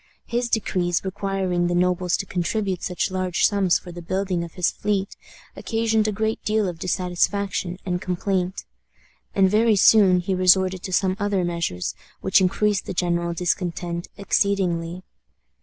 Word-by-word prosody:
His 240 0 -1
decrees 180 -5 0
requiring 190 -2 -1
the 175 - 0
nobles 180 0 +1
to - - -4
contribute 190 +1 -2
such 180 +1 -2
large 185 -1 +1
sums 195 -4 +3
for 175 - -11
the 175 0 -8
building 185 0 -2
of 170 - -9
his 180 -2 +1
fleet 200 -1 -2 0.4
occasioned 225 -1 0
a - - +1
great 220 +2 -2
deal 215 -1 +1
of 175 -2 -5
dissatisfaction 185 +1 -1
and 180 -1 -2
complaint. 185 0 -2 0.7
And 195 -1 +5
very 215 +3 +3
soon 195 -2 +6
he 190 +2 -2
resorted 185 0 +3
to 190 - -6
some 185 +1 +1
other 205 -2 0
measures, 170 - -2 0.3
which 190 +1 +3
increased 195 +2 +1
the 185 - -4
general 170 -1 0
discontent 175 0 -2
exceedingly. 185 -4 0
185 Hz, 150 wpm, -23 LUFS, 175-200 Hz, 0.7 s, soon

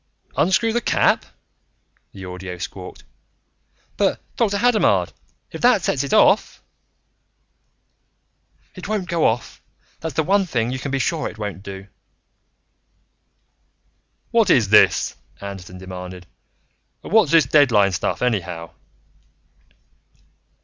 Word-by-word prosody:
"Unscrew 220 +7 +2
the 240 - 0
cap?" - - +2 0.9
the 95 -1 -10
audio 90 0 -7
squawked. 90 +1 -8 0.9
"But - - +1 0.2
Dr. 205 -4 +1
Hadamard, 235 0 +2 0.4
if - - -8
that 245 -6 +4
sets 140 - 0
it 140 - -5
off - - +3 1.4
" - - -43
"It 185 - -9
won't 210 -3 -2
go 170 -1 +2
off. 115 +1 -3 0.4
That's 160 -4 -5
the 160 - +2
one 195 +3 +2
thing 120 -6 -1
you 130 - -4
can 140 - -5
be 135 - -1
sure 155 +4 -1
it - - -13
won't 105 -3 -5
do." 95 -1 -9 2.5
"What 225 -4 +3
is 115 - +4
this?" 105 - +4 0.2
Anderton 95 -2 -8
demanded. 90 -1 -9 0.8
"And - - -8
what's 215 -8 +5
this 165 -4 +5
deadline 125 -8 +4
stuff, 90 - -2
anyhow?" 90 -8 -2
125 Hz, 120 wpm, -21 LUFS, -, 2.5 s, what's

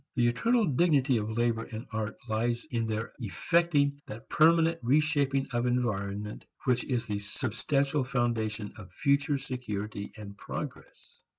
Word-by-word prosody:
The 120 -2 +3
eternal 230 - +3
dignity 140 -4 +3
of 105 0 -2
labor 115 -1 +1
and 115 +2 -7
art 110 -1 -2
lies 120 +3 0
in 115 -2 0
their 110 +1 -3
effecting 145 - +1
that 115 +4 -8
permanent 165 +1 +4
reshaping 140 +1 +2
of 120 +1 +1
environment 105 -4 -1 0.2
which 125 -2 +2
is 120 -3 -1
the 105 -2 -2
substantial 135 +7 0
foundation 115 -4 -1
of 95 -4 -11
future 140 +5 +2
security 110 -6 -5
and 100 -1 -8
progress. - - -8
120 Hz, 135 wpm, -29 LUFS, 110-140 Hz, 0.2 s, permanent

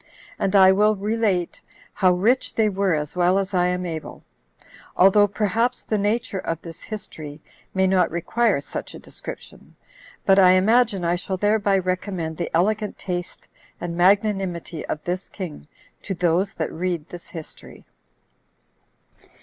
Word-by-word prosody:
And 195 +1 0
I 190 -1 +8
will 210 +2 +3
relate 205 -3 -1 0.3
how 185 -3 +3
rich 220 +9 +1
they 220 -2 +3
were 195 -3 +1
as 150 +1 -4
well 180 +1 +3
as 195 0 -2
I 180 -1 +3
am 180 0 -1
able, 160 -3 -6 0.7
although 200 +2 +6
perhaps 220 +5 0
the 215 - -1
nature 205 -1 -1
of 165 -3 -3
this 165 -1 -10
history 155 -8 -8 0.4
may 190 0 +3
not 185 -2 +3
require 190 +1 +1
such - - -7
a - - -9
description; - - -10 0.5
but 195 0 +5
I 185 -1 +7
imagine 205 0 +3
I 170 - +2
shall 190 +1 -4
thereby 205 0 +2
recommend 185 -3 -3
the 175 - -3
elegant 210 +5 0
taste 175 -1 -5 0.3
and 170 -1 -4
magnanimity 190 -3 +1
of 150 - -4
this 180 +2 -4
king 175 -6 -8 0.3
to 195 - -4
those 175 +3 +1
that 160 - -3
read 170 -2 -2
this 175 -1 -10
history. 165 -3 -11
185 Hz, 150 wpm, -23 LUFS, 175-205 Hz, 0.7 s, I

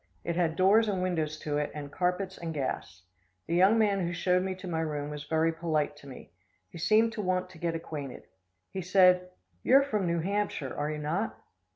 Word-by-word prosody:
It 170 - -2
had 170 -2 +1
doors 200 +5 +5
and 190 -3 0
windows 160 -4 -1
to 150 -1 -1
it, 150 - -1
and 145 -1 -6
carpets 180 +2 -1
and 165 -2 -5
gas. 115 -9 -4 0.4
The 165 - -3
young 190 +6 +5
man 205 -3 +3
who 175 -1 -1
showed 180 +1 +2
me 190 0 -2
to 185 0 -9
my 165 -2 -2
room 150 -2 -3
was 150 0 -6
very 160 +1 +1
polite 155 -3 -1
to 145 - -14
me. 130 - -11 0.4
He - - -9
seemed 215 +6 +3
to 225 - -3
want 185 -1 -1
to 170 - -14
get 170 0 -1
acquainted. 150 -5 -6 0.5
He 190 - -4
said: 180 0 +4 0.3
"You 260 - +4
are 275 - +8
from 210 -9 -1
New 170 0 +1
Hampshire, 195 -7 -2
are 145 +1 -2
you 155 - -3
not?" 165 +9 -2
170 Hz, 215 wpm, -29 LUFS, 155-190 Hz, 0.5 s, are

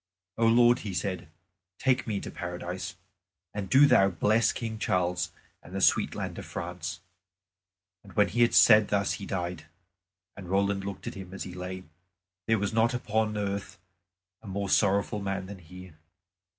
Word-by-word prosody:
"O 115 0 +2
Lord," 120 +1 +5
he 100 -4 -5
said, 95 -3 -3 0.5
"take 130 -2 +1
me 110 - -1
into 100 - -4
Paradise. 90 +1 -5 0.6
And 100 -2 -4
do 135 +7 +7
Thou 95 -8 +5
bless 110 +6 +2
King 110 -2 -5
Charles 90 -3 0 0.3
and 90 - -11
the - - -1
sweet - - +3
land - - -4
of - - -8
France." 85 0 -5 1.0
And 100 - -15
when 105 -1 +3
he 120 - 0
had 120 - +4
said 105 -2 +7
thus 100 -1 +1
he 100 - -6
died. 90 -3 -4 0.7
And 95 -3 -10
Roland 100 0 +1
looked 100 -1 -6
at - - -4
him 95 -1 -9
as - - -4
he 90 - -8
lay. 90 +1 -6 0.6
There 115 - +3
was 100 +1 -2
not 115 +2 +2
upon 110 -2 -1
earth 100 -1 -3 0.6
a 110 - -13
more 100 0 -3
sorrowful 100 +1 +2
man 95 -1 -3
than 100 0 -9
he. 90 +1 -12
100 Hz, 170 wpm, -28 LUFS, 90-110 Hz, 1.0 s, do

